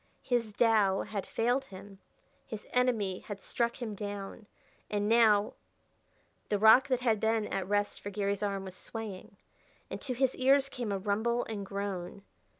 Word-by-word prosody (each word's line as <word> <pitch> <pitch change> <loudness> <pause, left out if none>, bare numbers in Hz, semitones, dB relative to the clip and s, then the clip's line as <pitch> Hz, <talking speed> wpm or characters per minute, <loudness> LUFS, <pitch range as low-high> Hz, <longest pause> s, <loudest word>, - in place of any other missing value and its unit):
His 235 -4 0
Tao 210 -4 +3
had 200 -3 -5
failed 245 +4 0
him; 195 -3 -12 0.5
his 215 -2 -7
enemy 225 -7 +1
had 205 -2 -8
struck 235 +4 -2
him 230 -4 -4
down; 205 0 -6 0.4
and 205 0 0
now 220 -2 +4 1.0
The 205 - +2
rock 220 +6 +7
that 255 -2 0
had 225 -4 +2
been 220 -1 0
a 195 - 0
rest 205 +2 -1
for 205 - -5
Garry's 200 0 -1
arm 200 -2 -2
was 185 -1 -9
swaying, 215 -2 -8 0.5
and - - -5
to 255 -3 -3
his 260 +1 +2
ears 270 +1 +4
came 240 -6 -4
a 200 - 0
rumble 220 +5 0
and 210 -3 -5
groan. 195 -1 -5
210 Hz, 160 wpm, -31 LUFS, 200-235 Hz, 1.0 s, rock